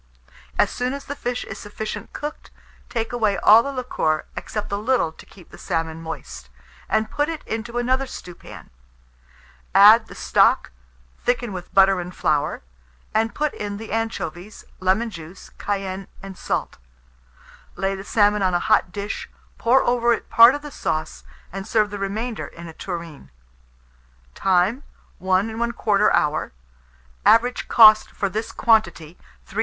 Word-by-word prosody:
As -, -, +3 dB
soon 250 Hz, +1 st, -2 dB
as 280 Hz, -, -9 dB
the 285 Hz, -, -5 dB
fish 245 Hz, -3 st, -3 dB
is -, -, -8 dB
sufficiently 215 Hz, 0 st, -6 dB
cooked, 295 Hz, +1 st, -7 dB, 0.4 s
take 230 Hz, -1 st, -3 dB
away 215 Hz, -4 st, +1 dB
all 215 Hz, +5 st, +7 dB
the 280 Hz, -, -4 dB
liquor, 240 Hz, -, -1 dB
except 210 Hz, -2 st, -5 dB
a -, -, 0 dB
little 225 Hz, -5 st, +1 dB
to -, -, -16 dB
keep 185 Hz, -4 st, -17 dB
the -, -, -13 dB
salmon 165 Hz, -2 st, -3 dB
moist, 65 Hz, -, -8 dB, 0.4 s
and 220 Hz, 0 st, 0 dB
put 295 Hz, +1 st, 0 dB
it 325 Hz, -2 st, -5 dB
into 230 Hz, +2 st, -4 dB
another 260 Hz, +2 st, 0 dB
stewpan; 180 Hz, -8 st, -11 dB, 1.0 s
add 215 Hz, +3 st, +8 dB
the -, -, -12 dB
stock, -, -, +2 dB, 0.5 s
thicken 245 Hz, -3 st, 0 dB
with 180 Hz, -1 st, -8 dB
butter 195 Hz, -1 st, +5 dB
and 180 Hz, +1 st, -8 dB
flour, 150 Hz, -, 0 dB, 0.5 s
and 220 Hz, 0 st, 0 dB
put 300 Hz, -1 st, -1 dB
in 205 Hz, -1 st, -5 dB
the 220 Hz, +1 st, -9 dB
anchovies, 215 Hz, -4 st, -4 dB
lemon 195 Hz, +5 st, +1 dB
juice, 170 Hz, 0 st, -11 dB
cayenne, 195 Hz, -1 st, -3 dB, 0.2 s
and 195 Hz, -1 st, -8 dB
salt; -, -, -3 dB, 1.0 s
lay 195 Hz, +2 st, -1 dB
the 195 Hz, 0 st, -6 dB
salmon 205 Hz, 0 st, +2 dB
on 185 Hz, -2 st, +1 dB
a -, -, +2 dB
hot 195 Hz, -4 st, +2 dB
dish, 205 Hz, +1 st, -5 dB, 0.3 s
pour 250 Hz, +3 st, +4 dB
over 240 Hz, -1 st, +2 dB
it -, -, -6 dB
part 235 Hz, +4 st, +8 dB
of 290 Hz, -, -7 dB
the 295 Hz, -, -8 dB
sauce, 155 Hz, -, -3 dB, 0.3 s
and 195 Hz, +2 st, -6 dB
serve 215 Hz, -3 st, +1 dB
the 205 Hz, -, -5 dB
remainder 215 Hz, +4 st, -3 dB
in 170 Hz, 0 st, -11 dB
a 165 Hz, -, -10 dB
tureen. 170 Hz, -, -7 dB, 1.0 s
Time. 190 Hz, -, +1 dB, 0.4 s
1 190 Hz, +2 st, +1 dB
1/4 220 Hz, -3 st, +2 dB
hour. 150 Hz, -, 0 dB, 0.7 s
Average 245 Hz, +2 st, +3 dB
cost 215 Hz, -2 st, +7 dB
for 200 Hz, -, -2 dB
this 220 Hz, +3 st, -4 dB
quantity, 175 Hz, -9 st, +1 dB, 0.3 s
3s. -, -, -6 dB
210 Hz, 155 wpm, -22 LUFS, 185-235 Hz, 1.0 s, add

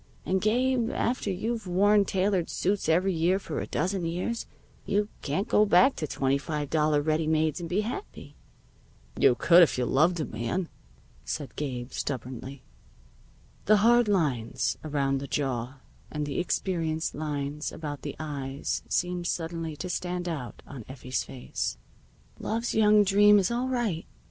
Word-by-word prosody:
And, 190 Hz, 0 st, +1 dB
Gabe, 240 Hz, +2 st, +2 dB
after 240 Hz, -4 st, -1 dB
you've 220 Hz, +3 st, -2 dB
worn 200 Hz, +3 st, +4 dB
tailored 190 Hz, -2 st, 0 dB
suits 195 Hz, -2 st, 0 dB
every 185 Hz, +4 st, +3 dB
year 170 Hz, +3 st, +2 dB
for 195 Hz, -, -4 dB
a -, -, -4 dB
dozen 185 Hz, 0 st, -1 dB
years, 180 Hz, +8 st, -2 dB, 0.4 s
you 205 Hz, +1 st, 0 dB
can't 185 Hz, -, -1 dB
go 210 Hz, -, +4 dB
back 200 Hz, +6 st, +5 dB
to 155 Hz, -, -2 dB
twenty 135 Hz, 0 st, 0 dB
five 150 Hz, -1 st, -4 dB
dollar 150 Hz, -2 st, +2 dB
ready 155 Hz, +1 st, +1 dB
mades 155 Hz, -1 st, +1 dB
and 170 Hz, -1 st, -6 dB
be 190 Hz, +4 st, +1 dB
happy." 245 Hz, -, -7 dB, 0.8 s
"You -, -, +4 dB
could 175 Hz, 0 st, +6 dB
if 165 Hz, -, +4 dB
you 125 Hz, -, +1 dB
loved 160 Hz, +8 st, +3 dB
a 155 Hz, -, -1 dB
man," 120 Hz, -, -3 dB, 0.5 s
said 145 Hz, -3 st, -5 dB
Gabe 125 Hz, -4 st, -4 dB
stubbornly. 130 Hz, 0 st, -5 dB, 1.0 s
The 215 Hz, +1 st, +6 dB
hard 240 Hz, 0 st, +5 dB
lines 145 Hz, -, 0 dB
around 140 Hz, -3 st, 0 dB
the 140 Hz, -, -6 dB
jaw 130 Hz, -2 st, -2 dB, 0.3 s
and 150 Hz, -1 st, -3 dB
the 145 Hz, -, -3 dB
experienced 165 Hz, -3 st, -1 dB
lines 150 Hz, 0 st, -3 dB
about 145 Hz, -3 st, -6 dB
the 145 Hz, -, -5 dB
eyes 140 Hz, -3 st, -3 dB
seemed 180 Hz, -1 st, -1 dB
suddenly 165 Hz, -2 st, -3 dB
to 180 Hz, -, -5 dB
stand 180 Hz, 0 st, -3 dB
out 145 Hz, -8 st, -5 dB
on 130 Hz, -5 st, -9 dB
Effie's 130 Hz, -1 st, -3 dB
face. 125 Hz, -, -4 dB, 0.6 s
"Love's 230 Hz, +2 st, -2 dB
young 210 Hz, -1 st, +5 dB
dream 205 Hz, +1 st, +6 dB
is 195 Hz, +1 st, +2 dB
all 245 Hz, +2 st, 0 dB
right. 235 Hz, -10 st, -1 dB
170 Hz, 155 wpm, -28 LUFS, 145-200 Hz, 1.0 s, could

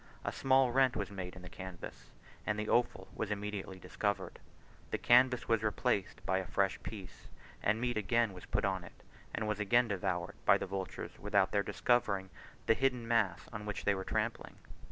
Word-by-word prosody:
A -, -, 0 dB
small 130 Hz, -1 st, +3 dB
rent 130 Hz, 0 st, +4 dB
was 100 Hz, -1 st, -3 dB
made 95 Hz, -2 st, -6 dB
in 95 Hz, -, -11 dB
the -, -, -8 dB
canvas, 95 Hz, -1 st, -9 dB, 0.3 s
and 105 Hz, -, -1 dB
the 105 Hz, 0 st, -2 dB
offal 120 Hz, -6 st, +1 dB
was 110 Hz, -, -3 dB
immediately 105 Hz, -2 st, -4 dB
discovered; 100 Hz, +2 st, -2 dB, 0.5 s
the -, -, -1 dB
canvas 125 Hz, +1 st, +5 dB
was 115 Hz, -2 st, +3 dB
replaced 105 Hz, -1 st, 0 dB
by 95 Hz, -, +2 dB
a 95 Hz, -, -5 dB
fresh 100 Hz, -1 st, +1 dB
piece, 100 Hz, -5 st, -9 dB, 0.3 s
and 105 Hz, +2 st, +2 dB
meat 120 Hz, -1 st, 0 dB
again 110 Hz, +1 st, +2 dB, 0.2 s
put -, -, +1 dB
on 95 Hz, -2 st, 0 dB
it, -, -, -14 dB, 0.3 s
and 110 Hz, -, -2 dB
was 105 Hz, -1 st, -1 dB
again 120 Hz, +4 st, +4 dB
devoured 90 Hz, -3 st, -2 dB
by -, -, +6 dB
the -, -, -3 dB
vultures 95 Hz, -1 st, -5 dB
without 100 Hz, -2 st, +2 dB
their 100 Hz, -, +3 dB
discovering 100 Hz, -4 st, +1 dB, 0.3 s
the -, -, +5 dB
hidden 125 Hz, -1 st, 0 dB
mass 110 Hz, -7 st, +1 dB
on 105 Hz, -1 st, -5 dB
which 105 Hz, -, -4 dB
they 100 Hz, -, +4 dB
were 95 Hz, -1 st, -3 dB
trampling. -, -, -2 dB
105 Hz, 185 wpm, -34 LUFS, 95-115 Hz, 0.5 s, by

